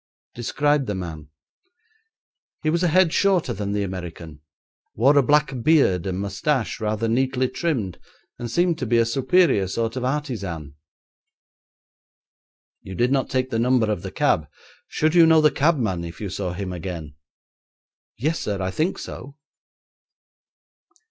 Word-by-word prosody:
"' - - -72
'Describe 145 +4 0
the 105 - -2
man.' 80 -5 -6 1.4
'He 155 - +2
was 170 +1 0
a 180 - +3
head 175 0 +3
shorter 195 -4 +2
than 100 0 -4
the 105 0 0
American, 85 -5 -7 0.5
wore 135 +6 +4
a 140 - +6
black 145 -1 +2
beard 115 - +3
and 95 0 -2
moustache 110 +7 -1
rather 110 +1 -1
neatly 130 +2 +1
trimmed, 125 - -2 0.4
and 120 - -5
seemed 170 +5 +1
to 130 - -3
be 120 +1 +2
a 115 - +4
superior 130 - +2
sort 115 +4 -2
of 130 - -3
artisan.' 105 - -3 2.1
'You 95 - -9
did 120 +7 +1
not 135 -2 +1
take 130 0 -1
the 115 - 0
number 120 -2 +2
of 105 - -2
the 95 - -6
cab. 80 -4 +1 0.4
Should 155 +1 0
you 170 -2 +7
know 160 0 +6
the 155 -1 +4
cabman 125 - +1
if 85 0 -8
you 105 - -4
saw 90 -1 -3
him 95 0 -5
again?' 85 -4 -6 1.0
'Yes, 155 +8 -1
sir, 100 -2 -3
I 95 0 -2
think 160 - -1
so.' 140 0 -8
115 Hz, 155 wpm, -23 LUFS, 95-150 Hz, 2.1 s, you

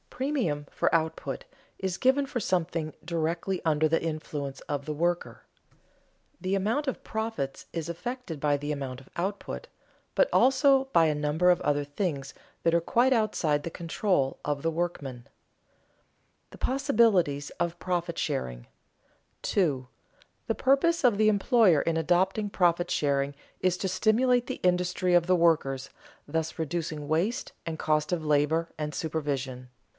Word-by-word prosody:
Premium 235 - -1
for - - 0
output 160 -4 -1 0.3
is 190 -1 -2
given 270 +2 +3
for 245 - -2
something 165 -5 -1
directly 170 +2 -1
under 155 -1 +3
the 165 +1 +1
influence 150 -4 -4
of 140 -1 -4
the 155 - -3
worker. 175 +3 -1 1.0
The 185 +1 -2
amount 220 +10 0
of 265 - -3
profits 220 -12 -3
is 165 -1 -3
affected 210 - -5
by 145 0 +2
the 145 +1 -4
amount 135 -3 -4
of 135 - -19
output, 200 - -4 0.5
but - - +3
also 270 +1 +5
by 170 -12 +4
a 155 -1 +2
number 150 +4 +2
of 180 - +4
other 145 0 +1
things 145 -2 -3 0.3
that 165 - +2
are 170 - +3
quite 245 +9 +3
outside 170 -10 +1
the 170 - -4
control 165 -4 0
of 145 -1 -1
the 165 - +1
workmen. 165 -6 -3
[Sidenote: - - -29 1.2
The - - -12
possibilities 215 - +2
of 170 0 -1
profit 175 -2 -2
sharing] - - -3 0.7
2. 145 -10 0 0.6
_The - - -1
purpose 300 +5 +3
of 240 -5 +4
the 215 0 +5
employer 205 - +4
in 165 -1 0
adopting 185 +6 +1
profit 175 -2 +2
sharing 140 -1 +1 0.2
is 185 -1 +2
to 190 - -2
stimulate 235 +6 +3
the - - -5
industry 180 0 +2
of 175 -1 +4
the 185 +1 +4
workers, 140 -6 +2 0.4
thus 160 +2 -2
reducing 160 -2 -3
waste 195 - 0
and 160 -2 -4
cost 155 -1 +1
of 165 -3 -1
labor 150 +3 +2
and 150 -1 -3
supervision. 140 -6 -3
170 Hz, 150 wpm, -28 LUFS, 150-195 Hz, 1.2 s, also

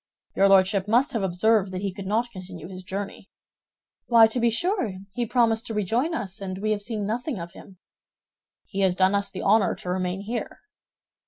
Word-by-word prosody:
"Your 195 +1 +4
Lordship 195 +1 +4
must 250 +7 +3
have 225 - -1
observed 195 +2 +2
that 185 +1 -5
he 195 -2 -2
could 195 0 -7
not 230 +4 0
continue 180 -4 -9
his 185 0 -8
journey." 195 +2 -6 0.8
"Why, 230 -2 +7
to 225 +3 -1
be 235 0 +3
sure, 245 - -1 0.2
he 240 -1 -2
promised 230 -1 +2
to 225 - -4
rejoin 235 - 0
us, 200 - -5
and 185 -1 -4
we 215 +2 -1
have 210 -1 0
seen 215 -1 -3
nothing 240 +5 -2
of 170 0 -7
him." 190 +1 -14 0.9
"He 195 - -6
has 190 -2 +3
done 190 +1 +3
us 200 0 0
the 190 - -6
honor 205 0 +3
to 180 - -5
remain 185 +1 -2
here." 230 +4 -5
200 Hz, 195 wpm, -25 LUFS, 190-230 Hz, 0.9 s, Why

